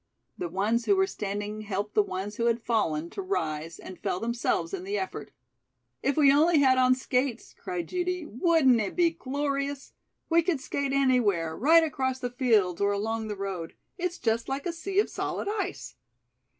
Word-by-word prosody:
The 175 - -4
ones 210 +6 0
who 400 - +4
were 385 0 +3
standing 205 - -4
helped 205 0 -3
the 210 - +5
ones 200 +1 -5
who 235 - 0
had 235 0 +2
fallen 170 -9 -1
to - - -5
rise 165 - -3
and 185 - -10
fell 180 - -2
themselves 235 - -1
in 375 -2 -4
the 400 +2 -2
effort. 380 - -5 0.7
"If 275 - 0
we 280 -3 +6
only 320 +3 +4
had 260 -2 +5
on 255 0 +5
skates," 255 -1 -2
cried 180 -1 -4
Judy, 360 -1 -2
"wouldn't 265 - +3
it 200 - -3
be 345 -2 +3
glorious? 280 -2 -3 0.3
We 335 0 +4
could 330 -3 0
skate 280 0 -2
anywhere, 230 -12 +2
right 325 - +5
across 260 -4 -1
the 245 -1 -4
fields 220 -8 +2
or 200 0 +3
along 220 +2 -2
the 210 -1 -4
road. 190 -4 -5 0.2
It's 355 0 -2
just 225 +2 -1
like 270 +1 -3
a 350 - -1
sea 375 +4 -5
of 415 - +4
solid - - -3
ice." 410 -3 -3
255 Hz, 185 wpm, -28 LUFS, 205-320 Hz, 0.7 s, we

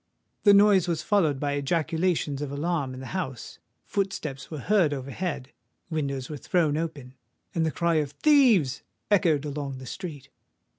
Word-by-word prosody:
The 205 - +8
noise 200 -3 +5
was 170 -2 -1
followed 165 -10 +2
by 145 0 -1
ejaculations 160 +1 0
of 145 -2 -4
alarm 145 -3 -2
in 130 - -8
the - - -7
house; 135 - -5 0.3
footsteps 160 -9 -3
were 155 - -6
heard 170 -1 +2
overhead; 140 +1 -4 0.4
windows 140 -4 -2
were 150 - -6
thrown 155 0 +1
open—and 140 0 -5
the - - +2
cry 170 +1 +1
of 150 -2 0
"Thieves!" 225 - +4 0.3
echoed 165 -7 +3
along 140 -2 -4
the 130 - -9
street. 155 -2 -7
150 Hz, 150 wpm, -26 LUFS, 140-175 Hz, 0.4 s, The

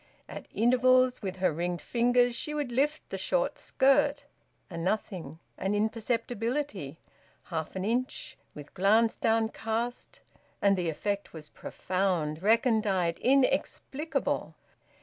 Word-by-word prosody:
At - - -9
intervals, 255 +2 +3
with 190 -3 -4
her 185 -2 +1
ringed 175 +2 -2
fingers 245 0 +2
she 300 +5 -3
would 290 -4 -2
lift 290 +5 0
the - - -3
short - - 0
skirt 285 +2 +2 0.4
a 175 - -10
nothing, 175 -3 -3 0.2
an 195 +2 0
imperceptibility, 225 - -2 0.5
half 160 -1 -5
an 190 0 -2
inch, 245 +4 -2 0.2
with 150 -1 -11
glance 220 +4 +3
downcast; 225 +1 -1 0.4
and 200 -1 +4
the 175 -3 -1
effect 200 +6 -3
was 155 -2 -9
profound, 180 -5 -2
recondite, 210 -5 +2
inexplicable. 275 +3 0
220 Hz, 115 wpm, -29 LUFS, 185-250 Hz, 0.5 s, and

